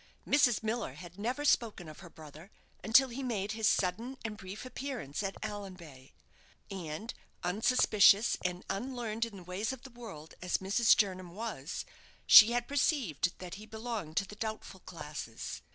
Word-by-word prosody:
Mrs. 245 -6 +4
Miller 220 - -2
had 175 +3 -11
never 250 +7 -2
spoken 220 - +1
of 155 - -11
her 180 -2 -11
brother 155 +3 -13 0.3
until 255 +4 +5
he 245 +3 -5
made 210 -6 -2
his 220 0 0
sudden 230 +9 0
and 215 -1 -3
brief 195 +3 -8
appearance 255 - -5
at 195 -1 -3
Allanbay; 180 -10 -8 0.6
and 190 +4 -5 0.3
unsuspicious 210 +2 +4
and 180 0 -3
unlearned 230 +1 -2
in 220 -4 -10
the 185 - -10
ways 185 +6 -3
of 265 -1 -8
the 265 - -11
world 210 -11 -10
as 180 -1 0
Mrs. 200 +4 +4
Jernam 185 -4 -1
was, 200 -9 -5 0.4
she 220 +1 +10
had 240 0 0
perceived 255 - 0
that 180 -1 -8
he 215 - -11
belonged 220 -8 -5
to 200 - +2
the 210 - -11
doubtful 220 0 -5
classes. - - -7
210 Hz, 160 wpm, -32 LUFS, 180-235 Hz, 0.6 s, she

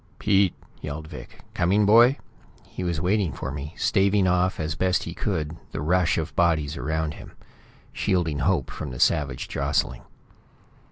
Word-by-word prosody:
"Pete!" 100 -3 +2 0.3
yelled 75 +1 -6
Vic. 75 - -11
"Coming, 100 +4 +2
boy?" 120 +6 +6 0.5
He - - -7
was 85 -3 -1
waiting 95 0 +1
for 65 - -5
me, 75 +3 -7
staving 100 -1 +2
off 90 0 +1
as 75 -1 -2
best 90 +3 +1
he 85 - -6
could 80 -5 -3 0.2
the - - -3
rush 90 +3 +2
of 80 0 -3
bodies 80 -4 +1
around 80 +3 -2
him; - - -12 0.6
shielding 85 -7 0
Hope 85 -6 0
from - - -6
the 60 -1 -7
savage 70 -4 +1
jostling. - - -1
85 Hz, 155 wpm, -25 LUFS, 75-95 Hz, 0.6 s, boy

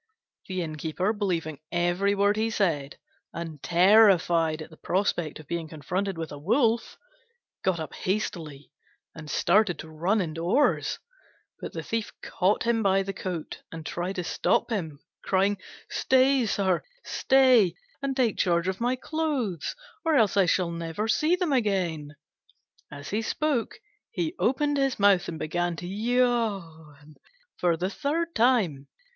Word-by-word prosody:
The 185 -2 -2
Innkeeper, 160 +5 -2
believing 170 -8 -2
every 175 +4 +1
word 200 +1 +3
he 220 +1 0
said, 165 -10 -1 0.4
and 165 -4 -6
terrified 175 -4 +4
at 155 - -14
the 160 - -14
prospect 175 -5 -1
of 155 - -12
being 165 +2 -4
confronted 180 +5 -3
with 165 -1 -5
a 145 - -7
wolf, 230 - +1 0.7
got 185 -3 +1
up 155 -3 -6
hastily 165 -7 -4 0.4
and 155 -2 -10
started 180 0 +2
to 160 - -9
run 175 +8 +1
indoors; 175 - +1 0.6
but - - -7
the - - -5
Thief 225 -1 -3
caught 190 +3 +1
him 230 -1 +1
by 195 -1 +3
the 195 0 -4
coat 180 -4 -5
and 160 -1 -8
tried 180 +3 -3
to 180 - -2
stop 205 - 0
him, 160 -9 -3 0.3
crying, 195 +1 +1 0.3
"Stay, 260 -1 +3
sir, 190 -4 +1 0.2
stay, 255 -7 +4 0.3
and 275 -1 -2
take 240 -5 +1
charge 170 0 +2
of 190 +3 -2
my 245 +2 +1
clothes, 260 - -2 0.3
or 325 -2 +2
else 220 -8 +3
I 195 -3 +4
shall 175 0 +1
never 170 +5 -3
see 310 +9 +3
them 360 -5 -1
again." 180 - -1 0.7
As 145 0 -9
he 215 +3 0
spoke 270 +1 -1 0.3
he 340 -7 -2
opened 290 +3 +1
his 270 -4 0
mouth 195 -2 +4
and 165 - -5
began 175 +2 -1
to 175 - -7
yawn 195 - -1 0.4
for 170 -2 +2
the 185 +3 -2
third 330 +6 -2
time. 215 - +2
190 Hz, 150 wpm, -27 LUFS, 165-225 Hz, 0.7 s, terrified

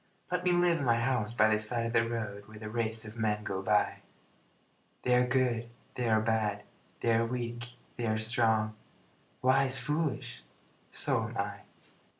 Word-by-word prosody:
Let 180 0 0
me 180 - +3
live 175 -1 +3
in - - -2
my 120 -3 +3
house 115 -3 0
by 110 -2 +4
the 105 -1 +3
side 115 +2 +1
of 115 - -3
the 115 -1 +4
road, 105 -3 -4
Where 110 0 -12
the 110 0 -7
race 110 -1 0
of 110 +2 -8
men 105 -1 0
go 95 -2 -3
by - - +2 1.1
They 125 - +2
are 125 0 +4
good, 120 -2 +1 0.2
they 125 -2 -1
are 110 0 +4
bad, 110 -2 0 0.4
they 115 - +3
are 115 0 +3
weak, 120 0 -4 0.2
they 120 -1 -2
are 110 0 +1
strong, 110 -1 +2 0.7
Wise, 130 +1 +4
foolish 135 -2 -2 0.5
so - - 0
am - - -8
I. - - -2
115 Hz, 175 wpm, -31 LUFS, 110-125 Hz, 1.1 s, by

